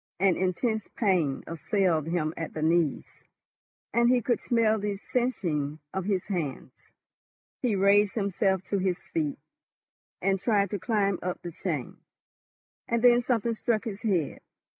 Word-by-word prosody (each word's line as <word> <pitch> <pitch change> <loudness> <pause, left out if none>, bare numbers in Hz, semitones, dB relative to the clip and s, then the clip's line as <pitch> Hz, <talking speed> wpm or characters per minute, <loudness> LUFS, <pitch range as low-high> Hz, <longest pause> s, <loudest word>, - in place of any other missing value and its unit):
An 190 -2 +4
intense 215 +4 -1
pain 175 - +1
assailed 165 -1 0
him 165 -2 -1
at 165 - -5
the 155 - -2
knees, 165 -2 +2 0.9
and 235 +1 +4
he 250 0 +4
could 240 +1 0
smell 225 -2 +2
the 205 0 -2
singeing 170 - -1 0.2
of 190 -1 -2
his 195 -3 0
hands. 165 -9 -3 0.9
He 240 -5 +1
raised 200 +1 +4
himself 195 -2 +1
to 200 - +2
his 185 -1 0
feet, 295 - -3 0.8
and 195 0 +1
tried 200 -2 +1
to 205 - -2
climb 200 -4 +1
up 180 0 -3
the 175 - -5
chain, 155 -6 -4 0.9
and 235 0 0
then 245 0 +7
something 235 -2 0
struck 220 -1 0
his 210 -4 -6
head. 190 - 0
195 Hz, 145 wpm, -28 LUFS, 175-225 Hz, 0.9 s, then